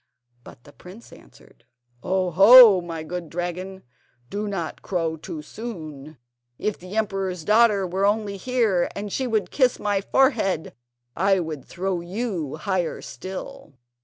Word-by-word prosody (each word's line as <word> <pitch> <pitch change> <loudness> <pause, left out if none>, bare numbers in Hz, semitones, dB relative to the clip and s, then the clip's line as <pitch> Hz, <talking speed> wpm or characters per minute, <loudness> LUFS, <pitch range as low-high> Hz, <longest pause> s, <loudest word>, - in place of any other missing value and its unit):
But 120 - -15
the 145 - -17
prince 190 +6 -14
answered: - - -19 0.4
"Oh, 185 +2 0
ho! 205 +2 +9
my 165 -2 -6
good 170 0 -6
dragon, 180 +3 -5 0.5
do 210 +1 -3
not 175 -6 -4
crow 165 -4 -2
too 155 -1 -8
soon! 155 - -8 0.4
If 210 - -3
the 185 +4 -8
emperor's 195 -5 -2
daughter 210 -2 +4
were 190 +3 0
only 205 -1 -1
here, 220 -5 +1
and 205 0 -5
she 260 - -1
would 215 -6 -1
kiss 255 -3 +2
my 205 -2 -1
forehead, 195 - +1 0.4
I 195 +2 +2
would 155 -5 -5
throw 185 -1 -3
you 180 - -4
higher 175 +2 -2
still." 185 +1 -8
190 Hz, 140 wpm, -23 LUFS, 170-210 Hz, 0.5 s, ho